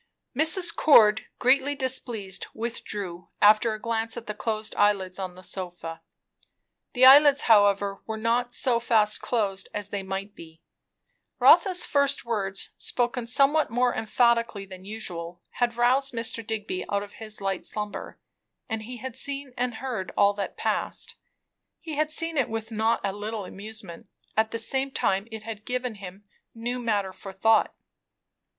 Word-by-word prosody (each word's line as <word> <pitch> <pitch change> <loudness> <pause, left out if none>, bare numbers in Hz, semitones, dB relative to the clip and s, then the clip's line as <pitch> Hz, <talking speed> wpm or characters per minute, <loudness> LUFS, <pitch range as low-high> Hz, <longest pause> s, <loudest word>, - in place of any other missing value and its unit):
Mrs. 335 +4 +4
Cord 220 -7 +5
greatly 270 +3 +2
displeased, 245 -7 -2
withdrew, 205 -6 -5
after 215 +2 +5
a - - -9
glance 225 0 -2
at 235 - -7
the 210 - -4
closed 215 0 -3
eyelids 195 -3 +1
on 185 -2 -5
the 185 - -13
sofa. 175 -4 -4 0.9
The 255 0 +5
eyelids 280 +1 +8
however 200 -2 +3
were 220 0 -3
not 235 +2 0
so 245 -1 +1
fast 220 -3 +2
closed 200 -5 -1
as 205 -1 -4
they 200 -1 -3
might 195 +1 -5
be; 160 -1 -14 0.7
Rotha's 370 -3 +5
first 280 -2 +1
words, 200 -4 -2
spoken 240 -1 -1
somewhat 280 +5 +3
more 245 +1 +1
emphatically 230 -2 +1
than 185 -1 -12
usual, 175 -5 -7 0.2
had 240 -1 +1
roused 255 +2 +2
Mr. 230 0 -2
Digby 210 -4 -4
out 200 0 0
of 205 - -12
his 215 -1 -4
light 195 -2 -2
slumber, 210 -1 -4 0.5
and 225 -2 -3
he 245 +3 -8
had 255 +1 -7
seen 275 0 -1
and 245 -1 -2
heard 235 -7 -4
all 200 0 +5
that 200 -1 -5
passed. - - -1 0.7
He 320 - -7
had 305 +1 +1
seen 330 +1 0
it 265 - +1
with 225 0 -5
not 220 +1 +1
a 195 -1 -1
little 210 0 -5
amusement; 200 -2 -9 0.3
at 220 0 +2
the 230 - -4
same 265 +4 -1
time 195 -5 0
it 220 -1 -8
had 215 -1 -7
given 250 0 -3
him 195 -1 -10 0.3
new 240 +2 -3
matter 205 -5 -1
for 195 - -10
thought. 220 +3 +2
220 Hz, 155 wpm, -26 LUFS, 200-245 Hz, 0.9 s, eyelids